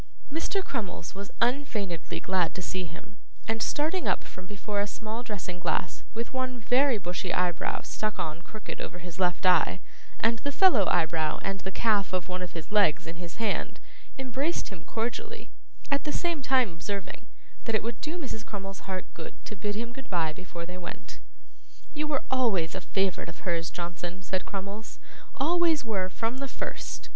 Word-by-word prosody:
Mr. 380 Hz, +4 st, +1 dB
Crummles 200 Hz, -9 st, -3 dB
was 200 Hz, 0 st, -6 dB
unfeignedly 230 Hz, -, +1 dB
glad 185 Hz, -3 st, +2 dB
to 185 Hz, -, -2 dB
see 185 Hz, 0 st, -1 dB
him, 200 Hz, +5 st, -10 dB, 0.3 s
and 225 Hz, 0 st, +1 dB
starting 320 Hz, +5 st, +2 dB
up -, -, +3 dB
from 185 Hz, 0 st, -10 dB
before 205 Hz, +1 st, -1 dB
a 205 Hz, -, +1 dB
small 220 Hz, +2 st, -3 dB
dressing 190 Hz, -6 st, -4 dB
glass, 180 Hz, 0 st, 0 dB
with 230 Hz, +3 st, -2 dB
one 255 Hz, -1 st, 0 dB
very 250 Hz, +2 st, +4 dB
bushy 180 Hz, -1 st, -2 dB
eyebrow 175 Hz, -1 st, +2 dB
stuck 215 Hz, 0 st, -1 dB
on 155 Hz, +1 st, -2 dB
crooked 215 Hz, +4 st, -7 dB
over 175 Hz, -, -4 dB
his 175 Hz, 0 st, -8 dB
left 180 Hz, +1 st, +3 dB
eye, 185 Hz, 0 st, +6 dB, 0.4 s
and 225 Hz, 0 st, +3 dB
the 285 Hz, -, -1 dB
fellow 285 Hz, -, +7 dB
eyebrow 160 Hz, -2 st, +3 dB
and 195 Hz, 0 st, -1 dB
the 190 Hz, +1 st, -4 dB
calf 205 Hz, -2 st, +3 dB
of 185 Hz, -1 st, 0 dB
one 185 Hz, 0 st, -2 dB
of 180 Hz, -, -4 dB
his 165 Hz, +1 st, -6 dB
legs 200 Hz, -9 st, +5 dB
in 165 Hz, 0 st, -5 dB
his 175 Hz, -1 st, -6 dB
hand, 220 Hz, -3 st, 0 dB, 0.4 s
embraced 265 Hz, +5 st, 0 dB
him 185 Hz, -6 st, -9 dB
cordially; 425 Hz, -, -3 dB, 0.4 s
at 280 Hz, -, +3 dB
the 300 Hz, -, 0 dB
same 340 Hz, -1 st, 0 dB
time 255 Hz, -6 st, +4 dB
observing, 200 Hz, +5 st, -4 dB, 0.4 s
that 225 Hz, -, +2 dB
it 215 Hz, -, +2 dB
would 230 Hz, -2 st, -3 dB
do 315 Hz, +3 st, -2 dB
Mrs. 255 Hz, -9 st, -4 dB
Crummles's 195 Hz, -2 st, -6 dB
heart 185 Hz, -1 st, -2 dB
good 165 Hz, -, -7 dB
to 210 Hz, -, -5 dB
bid 205 Hz, +2 st, -1 dB
him 235 Hz, +2 st, -3 dB
goodbye 175 Hz, -12 st, 0 dB
before 175 Hz, 0 st, -6 dB
they 180 Hz, +1 st, -6 dB
went. 205 Hz, +4 st, -7 dB, 0.7 s
'You 305 Hz, 0 st, 0 dB
were 290 Hz, -3 st, +1 dB
always 215 Hz, -11 st, +3 dB
a 190 Hz, -, -3 dB
favourite 195 Hz, -2 st, +1 dB
of 170 Hz, -, -9 dB
hers, 170 Hz, -2 st, +1 dB
Johnson,' 175 Hz, +1 st, -4 dB
said 185 Hz, 0 st, -1 dB
Crummles, 200 Hz, +2 st, -5 dB, 0.4 s
'always 320 Hz, 0 st, +4 dB
were 195 Hz, -5 st, +1 dB
from 230 Hz, +7 st, -1 dB
the 275 Hz, -, -1 dB
first. -, -, -4 dB
205 Hz, 180 wpm, -30 LUFS, 180-245 Hz, 0.7 s, fellow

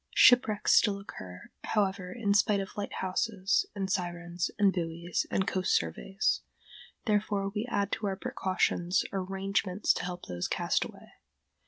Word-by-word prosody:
] -, -, -17 dB
Shipwrecks 225 Hz, -4 st, +5 dB
still 200 Hz, -3 st, +4 dB
occur, 95 Hz, -, -10 dB
however, 195 Hz, -3 st, 0 dB
in 205 Hz, -2 st, 0 dB
spite 205 Hz, 0 st, +3 dB
of 195 Hz, 0 st, -5 dB
lighthouses 195 Hz, 0 st, 0 dB
and 195 Hz, -1 st, -2 dB
sirens 175 Hz, -2 st, -2 dB
and 200 Hz, -2 st, +4 dB
buoys 170 Hz, 0 st, -2 dB
and 190 Hz, -, +1 dB
coast 185 Hz, 0 st, +1 dB
surveys; 135 Hz, -, 0 dB, 0.6 s
therefore 205 Hz, -2 st, +1 dB
we 215 Hz, +3 st, -2 dB
add 200 Hz, -3 st, 0 dB
to 210 Hz, -, -1 dB
our 195 Hz, -, -1 dB
precautions 185 Hz, -2 st, 0 dB
arrangements 195 Hz, 0 st, 0 dB
to -, -, -4 dB
help 180 Hz, 0 st, -5 dB
those 90 Hz, 0 st, -3 dB
cast -, -, +1 dB
away. -, -, -12 dB
195 Hz, 145 wpm, -30 LUFS, 180-205 Hz, 0.6 s, Shipwrecks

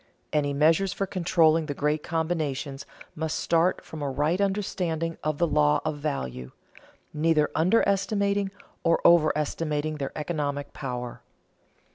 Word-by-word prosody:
Any 145 Hz, -2 st, +1 dB
measures 160 Hz, +6 st, +3 dB
for 195 Hz, -, -1 dB
controlling 165 Hz, -4 st, +2 dB
the 145 Hz, -, -3 dB
great 150 Hz, +2 st, 0 dB
combinations 155 Hz, -5 st, -2 dB, 0.3 s
must 160 Hz, 0 st, -2 dB
start 170 Hz, +2 st, +1 dB
from 160 Hz, -, -8 dB
a 145 Hz, -, -1 dB
right 150 Hz, +8 st, 0 dB
understanding 180 Hz, -5 st, -1 dB
of 155 Hz, -1 st, -1 dB
the 170 Hz, -, +3 dB
law 75 Hz, -, +3 dB
of 155 Hz, -1 st, -2 dB
value, 65 Hz, -, -4 dB, 0.6 s
neither 155 Hz, -1 st, +2 dB
underestimating 200 Hz, +2 st, +2 dB, 0.3 s
nor 165 Hz, 0 st, +3 dB
overestimating 155 Hz, -1 st, +2 dB
their 140 Hz, -2 st, -3 dB
economic 145 Hz, -3 st, -3 dB
power. 125 Hz, -3 st, -5 dB
155 Hz, 125 wpm, -26 LUFS, 145-170 Hz, 0.6 s, measures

